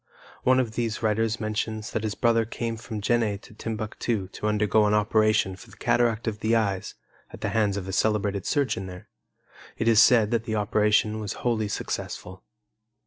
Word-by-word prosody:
One 130 0 +4
of 120 -4 0
these 115 0 -3
writers 110 +1 +1
mentions 110 0 -3
that 110 - -1
his 105 -1 -2
brother 115 -1 +3
came 115 +1 -4
from 110 -1 -6
Jenne 110 -2 +1
to 120 - -15
Timbuctu 110 -2 -3
to 105 - -4
undergo 105 0 +3
an 105 - +3
operation 105 -2 +2
for 95 - -15
cataract 120 -1 +1
of 110 -1 -2
the 110 +1 +2
eyes 100 -4 -1 0.3
at - - -12
the - - -1
hands 105 -3 +1
of 95 -1 -5
a 95 - -4
celebrated 105 -2 0
surgeon 115 -10 0
there. 90 0 -10 0.7
It 115 - -1
is 115 -1 +7
said 115 -3 +5
that 115 -1 0
the 110 - -2
operation 105 +1 +2
was 105 -1 -4
wholly 110 -3 +1
successful. 105 - -5
110 Hz, 180 wpm, -26 LUFS, 105-115 Hz, 0.7 s, is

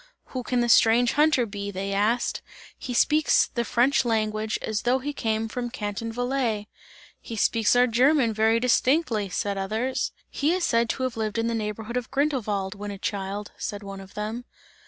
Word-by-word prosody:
"Who 255 - -2
can 245 0 0
the 240 - +1
strange 235 +1 +5
hunter 295 -4 +3
be?" 200 -1 -5
they 195 0 -3
asked, 215 +5 0 0.3
"He 255 - -7
speaks 300 +5 +3
the 235 - 0
French 245 +5 +2
language 215 -2 0
as 215 -1 -1
though 245 +2 +2
he 290 +3 -4
came 220 -3 -1
from 240 +2 -4
Canton 225 -1 -4
Valais!" 245 -3 -1 0.5
"He 230 - -7
speaks 225 +1 +2
our 245 0 +6
German 250 0 +3
very 220 +1 +3
distinctly!" 250 - +2
said 200 +1 -2
others. 220 +7 -1 0.2
"He 295 +4 0
is 365 -1 -1
said 230 -6 +2
to 260 - -2
have 255 -2 -2
lived 215 -1 -2
in 230 - 0
the 235 - 0
neighbourhood 220 +2 -3
of 245 -2 -4
Grindelwald, 230 -9 -1
when 205 0 -7
a 200 - -6
child!" 200 0 -4
said 205 0 -5
one 195 -1 -7
of 195 0 -14
them. 220 +3 -4
230 Hz, 185 wpm, -25 LUFS, 210-250 Hz, 0.5 s, our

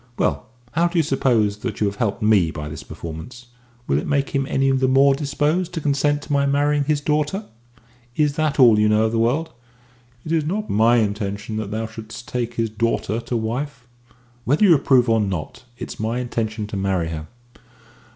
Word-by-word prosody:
"Well, - - 0 0.2
how 170 +2 +2
do 175 0 -3
you 165 - +4
suppose 120 -7 +1
that 110 -1 -5
you 105 - +2
have 100 0 -2
helped 110 0 -1
me 105 -6 +4
by 75 -1 -6
this 75 -1 -7
performance? 115 +10 -9 0.4
Will 70 - +1
it - - -5
make 140 -1 +1
him 135 -1 0
any 135 0 +2
the 130 0 +2
more 135 +1 +5
disposed 150 +5 -1
to - - -1
consent 145 0 +1
to - - -4
my 140 0 +2
marrying 145 +1 +2
his 150 0 +1
daughter? 150 +7 -1 0.7
Is 150 -2 +2
that 155 -2 0
all 115 -5 +7
you 105 0 +3
know 105 +1 +3
of 110 - 0
the 115 - 0
world?" 145 +8 +1 0.7
"It 160 - -5
is 160 -2 +2
not 205 +8 -3
my 115 +3 +4
intention 105 0 -2
that 110 -2 -3
thou 110 +1 -3
shouldst 110 +2 -9
take 120 -1 -3
his 115 -2 -1
daughter 115 0 -1
to 120 0 -3
wife." 125 +4 -4 0.6
"Whether 145 - +2
you 190 -5 +7
approve 130 -4 +4
or 115 -1 +3
not, 95 - -4
it's - - -7
my 110 +2 -1
intention 115 -3 -3
to 105 - -7
marry 95 -4 0
her." 80 -1 -6
120 Hz, 200 wpm, -21 LUFS, 105-145 Hz, 0.7 s, all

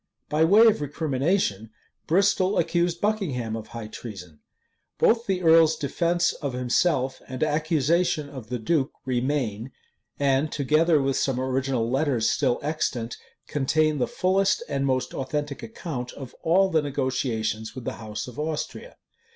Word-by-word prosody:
By 150 +1 +2
way 210 +7 +7
of 215 -9 +4
recrimination, 145 - -1 0.4
Bristol 195 +2 +2
accused 175 0 +1
Buckingham 150 - -1
of 110 -1 -7
high 115 -2 -7
treason. 95 -8 -9 0.6
Both 230 +1 +3
the 185 -2 0
earl's 160 -1 +6
defence 170 +4 0
of 140 -3 -5
himself 130 +2 0
and 130 +2 -3
accusation 155 +1 +1
of 130 -6 -10
the 125 - -2
duke 135 +4 0
remain;[] 125 -3 -1 0.5
and, 140 +2 +2
together 155 +3 +3
with 135 0 0
some 130 -2 0
original 130 -2 0
letters 130 -3 +1
still 130 -4 +1
extant, 135 -6 -2 0.3
contain 150 +1 +1
the 125 - +1
fullest 190 +7 +1
and 140 -2 -1
most 130 -1 -1
authentic 145 +2 -3
account 145 - -6
of 135 -3 -9
all 190 +4 +3
the 160 -2 +3
negotiations 130 -6 -2
with 130 -3 -7
the - - -4
house 105 +1 -5
of 125 +2 -9
Austria. 155 - -4
140 Hz, 145 wpm, -25 LUFS, 125-165 Hz, 0.6 s, way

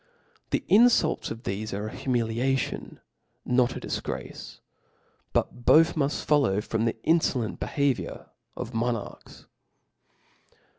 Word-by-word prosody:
The - - 0
infultsf 220 -7 +4
of 115 +2 -7
thefe 105 +3 -4
aire 105 +2 -3
a - - -11
humiliaticfn, 125 +1 -1 0.5
not 125 -1 +3
^ - - -6
difgrace,, - - -6 0.7
but 120 - -1
both 160 +6 +6
muft 145 -2 -1
follow 140 -10 +3
from 110 +1 -1
the 115 - 0
infcilenC 125 - +1
behaviour 140 -3 -1 0.3
of 125 -1 -5
monafchs. 115 -2 -4
125 Hz, 110 wpm, -27 LUFS, 115-145 Hz, 0.7 s, both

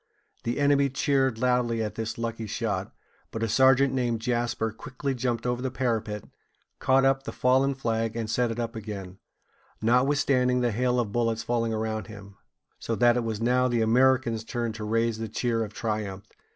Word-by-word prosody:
The 120 +4 -1
enemy 140 -1 +3
cheered 135 -2 +1
loudly 120 -2 +1
at 105 - -3
this 110 0 -4
lucky 115 -1 -4
shot; 100 -3 -2 0.4
but 115 - -4
a - - +1
sergeant 130 +3 +4
named 120 -3 0
Jasper 120 -1 -1
quickly 130 +5 -4
jumped 120 -2 -2
over 125 0 -1
the 130 - -1
parapet, 110 -5 -2 0.6
caught 135 0 +3
up 135 0 +3
the 140 - -6
fallen 135 +2 +2
flag, 115 -3 -1
and 115 -2 -2
set 120 +2 +1
it 115 +1 -4
up 115 0 -3
again, 100 -4 -7 0.6
notwithstanding 125 +1 +2
the 120 -1 +1
hail 125 +3 +1
of 110 -4 -1
bullets 115 0 0
falling 115 -1 0
around 110 0 -2
him; 100 -2 -11 0.4
so 115 - -2
that 120 +1 +4
it 125 - 0
was 110 -2 -3
now 125 +2 +2
the 120 -2 +1
Americans' 120 -1 +3
turn 115 0 -3
to 110 0 -7
raise 115 +1 0
a 115 - -3
cheer 115 0 -1
of 105 - -6
triumph. 105 -3 -3
115 Hz, 180 wpm, -27 LUFS, 110-125 Hz, 0.6 s, sergeant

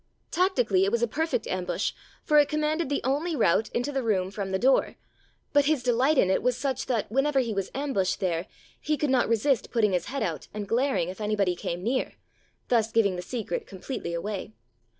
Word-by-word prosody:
Tactically, 245 - +2
it 195 - +1
was 235 0 +1
a - - +3
perfect 315 -2 -1
ambush, 185 -1 -1 0.3
for 300 -1 +5
it 290 - +4
commanded 305 0 0
the 285 - -1
only 295 +6 0
route 215 - +2
into 245 +4 -2
the 270 -1 -1
room 190 -5 0
from 200 -1 -4
the 190 - 0
door; 260 +6 +2 0.6
but 285 -1 +5
his 295 -4 +1
delight 255 +5 +2
in 190 - +4
it - - +2
was 250 0 +1
such 265 -2 -2
that 230 -5 -1
whenever 270 +3 +2
he 235 -4 0
was 195 -2 -2
ambushed 260 -10 0
there, 175 -2 -1 0.3
he 305 0 -1
could 290 -1 0
not 250 -3 +2
resist 230 +2 +1
putting 215 -5 +2
his 180 - 0
head 275 +2 -3
out 165 -3 -3
and 205 -1 -4
glaring, 230 -7 +1
if 190 +4 -8
anybody 205 -4 +1
came 175 +1 -4
near, 255 +5 -1 0.5
thus 225 -2 +2
giving 210 -5 +3
the 180 - -4
secret 210 -2 -4
completely 190 -3 -5
away. 195 - -4
230 Hz, 205 wpm, -27 LUFS, 195-275 Hz, 0.6 s, for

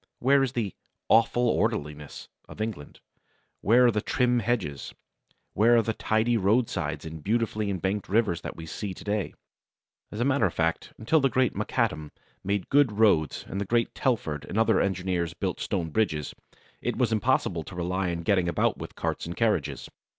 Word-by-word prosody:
Where 135 +2 +4
is 135 -2 0
the 110 -7 -2 0.4
"awful 115 +2 +4
orderliness" 75 -11 -2 0.2
of - - -11
England? 110 -10 -5 0.6
Where 120 +4 +5
are 120 - +5
the 105 -1 -1
trim 125 +1 +1
hedges? 110 - -2 0.6
Where 115 +4 +4
are 115 - +4
the 115 - -1
tidy 110 +2 +1
roadsides 95 -8 0
and 80 -1 -8
beautifully 110 -1 0
embanked 95 +1 -2
rivers 105 -4 +1
that - - -6
we 80 - -8
see 95 +3 -5
to - - -11
day? 105 -2 -2 0.7
As 105 - -7
a 120 - +1
matter 140 -6 +3
of 85 - -7
fact, 85 0 -1
until 140 +9 +2
the 135 -1 +2
great 125 -1 +1
Macadam 75 -1 -1 0.3
made 100 -1 -2
good 140 -5 +4
roads 100 -9 +2
and 100 - -4
the - - -2
great 115 +3 +1
Telford 90 - -1
and - - -5
other 115 - +3
engineers 90 -3 -1
built - - -3
stone 85 -4 -2
bridges, 80 -8 0 0.5
it - - -2
was - - +1
impossible 110 -6 +1
to 90 +4 -10
rely 90 +1 -1
on 85 -1 -3
getting 90 -2 +2
about 85 - 0
with - - -8
carts - - -3
and 85 - -6
carriages. 110 -10 0
105 Hz, 180 wpm, -27 LUFS, 85-115 Hz, 0.7 s, Where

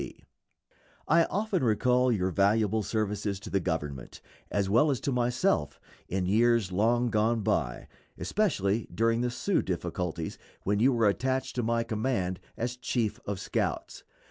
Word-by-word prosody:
T. - - -9 0.8
I 165 +1 +5
often 200 -5 -1
recall 125 +2 +3
your 95 -4 0
valuable 105 +2 +2
services 105 -2 -2
to 105 - -8
the 95 - +2
Government, 75 -7 -4 0.3
as 100 -1 0
well 120 +10 +4
as 135 -4 0
to 140 - -1
myself, 120 - 0 0.3
in 95 0 -1
years 115 0 +3
long 115 +5 +2
gone 110 +1 +2
by, - - -1 0.3
especially 115 - 0
during 115 +1 +1
the 125 - 0
Sioux 180 +10 0
difficulties, 85 -2 -3 0.2
when 100 +1 +1
you 130 +5 +5
were 115 -3 +3
attached 130 +5 0
to - - +2
my 115 0 +1
command 110 -5 -1 0.2
as 120 +1 -3
chief 120 -3 -1
of 100 -2 -2
scouts. - - -3
110 Hz, 150 wpm, -29 LUFS, 100-125 Hz, 0.8 s, I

